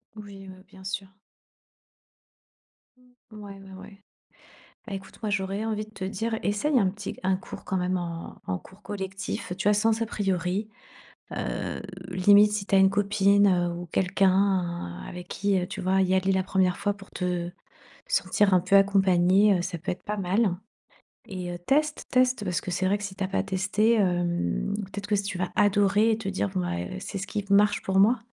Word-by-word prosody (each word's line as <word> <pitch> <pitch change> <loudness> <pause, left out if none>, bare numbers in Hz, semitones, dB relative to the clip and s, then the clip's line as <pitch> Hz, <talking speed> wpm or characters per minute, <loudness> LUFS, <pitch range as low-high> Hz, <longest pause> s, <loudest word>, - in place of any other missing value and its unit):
Oui, 200 -2 -10
mmh, 185 0 -12
bien 190 - -15
sûr. 195 0 -4 2.2
Ouais, 210 -2 -9
ouais, 195 -1 -13
ouais. 200 +1 -14 0.8
Bah, 210 - -5
écoute, 195 0 -9
moi, 215 - -1
j'aurais 195 +1 -1
envie 215 -1 -2
de 215 - -19
te 195 -3 -7
dire, 220 +4 -2
essaye 255 +8 +1
un 195 -5 +3
petit 200 +2 -6
c - - -16
un 190 0 +2
cours 185 - -10
quand 190 - -2
même 180 0 0
en 170 -1 -6
en 90 -1 -2
cours 190 - -18
collectif. 190 -2 -5
Tu 190 - +1
vois, 210 - +5
sans 220 +2 +2
a 230 - 0
priori, 195 0 -1 0.7
heu, - - -3 0.3
limite 205 +3 +5
si 210 -1 -2
tu 195 - +2
as - - +7
une 190 0 +6
copine, 200 0 +3
heu, 175 -2 +2
ou 175 +1 -6
quelqu'un 185 - +1
avec 180 0 -8
qui, 200 -1 0
heu, 180 - 0
tu - - -6
vois, 190 +1 +2
y 185 0 +1
aller 190 +1 +2
la 190 0 +1
1re 185 -1 +1
fois 205 0 0
pour 200 -1 -15
te 180 -1 -2 0.6
sentir 210 - +2
un 180 - +5
peu 185 +3 +3
accompagnée, 195 0 +4
heu, - - -1
ça 180 0 -4
peut 170 - -4
être 180 - -9
pas 210 - -3
mal, 195 0 +1 0.7
et 180 -2 -5
heu, - - -5
teste, 295 - 0
teste. 255 -2 +2
Parce 180 -3 -1
que 180 - -5
c'est 185 +2 0
vrai 200 +2 +2
que 205 - -9
si 195 -1 -7
tu 195 - -3
as - - 0
pas 195 - 0
testé, 205 +4 +1
hem, 175 - 0
peut 205 -2 -6
être 205 0 -5
que 210 - +2
s 200 - 0
tu 195 -2 -4
vas 180 0 -2
adorer 205 +2 +3
et 220 - +1
te 225 -3 -6
dire, 100 - -1
bon, 95 - -3
bah, 90 -1 -2
eh, 90 - -5
c'est 200 - -6
ce 195 - -5
qui 205 -1 -3
marche 205 +1 +4
pour 190 0 +1
moi. 225 +5 +5
195 Hz, 210 wpm, -26 LUFS, 185-205 Hz, 2.2 s, as